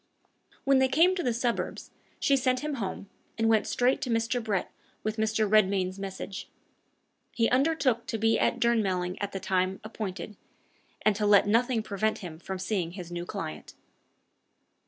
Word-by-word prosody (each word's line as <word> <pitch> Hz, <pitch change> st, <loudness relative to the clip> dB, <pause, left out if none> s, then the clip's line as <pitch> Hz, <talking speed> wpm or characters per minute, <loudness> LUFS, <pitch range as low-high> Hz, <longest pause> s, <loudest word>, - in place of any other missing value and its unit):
When 275 Hz, -1 st, +4 dB
they 265 Hz, -, +4 dB
came 330 Hz, +8 st, +4 dB
to 370 Hz, -, -2 dB
the 250 Hz, -, +1 dB
suburbs, 235 Hz, 0 st, -2 dB, 0.3 s
she 280 Hz, -, +3 dB
sent 255 Hz, -1 st, +1 dB
him 300 Hz, -1 st, -3 dB
home, 195 Hz, 0 st, -4 dB, 0.3 s
and 225 Hz, 0 st, +2 dB
went 220 Hz, -1 st, +3 dB
straight 250 Hz, +1 st, +2 dB
to 255 Hz, -, -3 dB
Mr. 230 Hz, +1 st, 0 dB
Brett 205 Hz, -5 st, -1 dB, 0.3 s
with 215 Hz, +1 st, -2 dB
Mr. 220 Hz, 0 st, +1 dB
Redmain's 195 Hz, -2 st, +2 dB
message. 195 Hz, 0 st, -6 dB, 0.9 s
He 230 Hz, -1 st, +3 dB
undertook 265 Hz, -3 st, +2 dB
to 225 Hz, -, -2 dB
be 225 Hz, +1 st, +2 dB
at -, -, +1 dB
Durnmelling 190 Hz, -6 st, +1 dB
at 200 Hz, 0 st, -2 dB
the 195 Hz, -, -4 dB
time 185 Hz, 0 st, 0 dB
appointed, 210 Hz, -2 st, -6 dB, 0.7 s
and 215 Hz, -, +4 dB
to 210 Hz, -1 st, +1 dB
let 205 Hz, -1 st, +6 dB
nothing 230 Hz, +2 st, +2 dB
prevent 215 Hz, +1 st, -1 dB
him 170 Hz, -5 st, -8 dB
from 190 Hz, +2 st, -5 dB
seeing 185 Hz, -3 st, -2 dB
his 180 Hz, -3 st, -8 dB
new 175 Hz, 0 st, -5 dB
client. 75 Hz, 0 st, -6 dB
215 Hz, 165 wpm, -28 LUFS, 190-240 Hz, 0.9 s, let